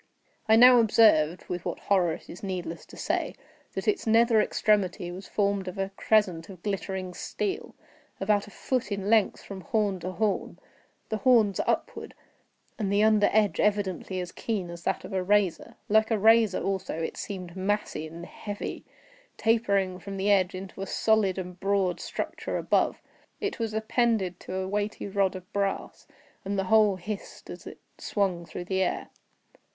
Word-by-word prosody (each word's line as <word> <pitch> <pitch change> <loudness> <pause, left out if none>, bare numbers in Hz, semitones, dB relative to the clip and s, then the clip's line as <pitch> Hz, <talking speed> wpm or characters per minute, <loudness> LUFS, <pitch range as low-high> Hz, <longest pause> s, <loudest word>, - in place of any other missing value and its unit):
I 220 - +8
now 245 +1 +8
observed—with 180 -6 +3
what - - -3
horror 180 -5 +2
it - - -10
is 175 - -10
needless 180 -4 -5
to - - -13
say—that - - -4
its 410 - +1
nether 225 0 +5
extremity 195 -5 +1
was 185 +2 -8
formed 200 -2 0
of 185 - -6
a 195 0 -2
crescent 195 -8 +1
of 185 -3 -12
glittering 190 -2 -3
steel, 385 - -4 0.4
about 205 +1 +1
a - - -10
foot 255 +2 -2
in 200 +1 -2
length 220 -3 +3
from 195 -1 -8
horn 200 0 0
to 185 +2 -5
horn; 215 0 -1 0.5
the 220 - -1
horns 220 -5 +4
upward, - - -2 0.6
and 200 -3 -1
the 205 +1 +3
under 215 -1 +4
edge 215 -1 +2
evidently 200 -3 0
as 180 -1 -5
keen 195 -7 -3
as 170 0 -9
that - - -1
of - - -8
a 190 - +1
razor. 195 -2 +1
Like 220 +1 +3
a 225 - +2
razor 220 -1 +4
also, 190 -4 -2
it 165 - -3
seemed 185 -3 -6
massy 195 -4 -2
and 165 +2 -9
heavy, 205 +2 -6 0.5
tapering 200 -5 +1
from 195 +1 -7
the 200 +2 +1
edge 185 -2 +3
into 190 +1 -8
a 195 - -4
solid 215 -4 +2
and 180 -1 -6
broad 195 -2 +1
structure - - -4
above. - - +1 0.4
It 410 - -3
was 225 -1 -1
appended 220 -4 0
to 185 - -7
a 190 0 -2
weighty 205 +2 -2
rod 195 -1 +1
of 185 -1 -10
brass, 200 -1 -2 0.4
and 200 +1 -2
the 195 - +1
whole 215 -3 +5
hissed 195 +3 -7
as - - -10
it - - -9 0.2
swung 185 -5 -1
through 175 - -6
the 190 +1 0
air. 185 - -1
200 Hz, 170 wpm, -27 LUFS, 185-215 Hz, 0.6 s, I